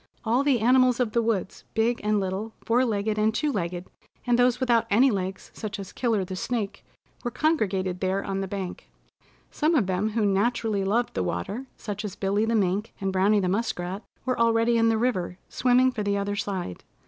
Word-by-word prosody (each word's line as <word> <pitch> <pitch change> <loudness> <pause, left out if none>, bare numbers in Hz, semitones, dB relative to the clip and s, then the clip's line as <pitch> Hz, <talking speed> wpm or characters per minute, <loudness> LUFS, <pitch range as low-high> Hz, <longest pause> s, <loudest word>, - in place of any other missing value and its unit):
All 240 +5 +2
the 270 -5 +2
animals 255 +1 +4
of 240 -3 +1
the 235 - +2
woods, 220 -5 -2
big 230 +2 +1
and 210 0 +2
little, 195 +3 -3
four 240 +3 +3
legged 215 -2 0
and 215 +1 +3
two 295 +7 0
legged, 175 -5 -3 0.4
and 245 -1 +2
those 245 0 +3
without 240 -3 +2
any 250 +6 +5
legs, 190 -2 -4
such 210 -1 -5
as 195 -1 -7
Killer 225 -6 0
the 185 +1 -6
Snake, 215 +1 -3 0.4
were 240 - -1
congregated 195 - 0
there 190 +1 0
on 195 0 -2
the 195 - -3
bank. 190 -2 -6 0.6
Some 320 +2 +1
of 245 -10 +3
them 190 +3 0
who 220 -2 +1
naturally 205 +1 +1
loved 230 +5 0
the 95 - -1
water, 90 - -3
such 210 -1 -5
as 205 -2 -5
Billy 200 +2 +1
the 230 +1 +1
Mink 200 +1 0
and 195 -2 -2
Browny 200 +3 +3
the 185 - 0
Muskrat, 190 -2 -2 0.2
were 255 -2 -1
already 230 0 +3
in 230 0 +4
the 225 - +2
river, 190 -7 -1
swimming 255 +1 +3
for 230 - -4
the 200 -1 0
other 200 0 -1
side. 195 - -4
215 Hz, 200 wpm, -26 LUFS, 195-235 Hz, 0.6 s, any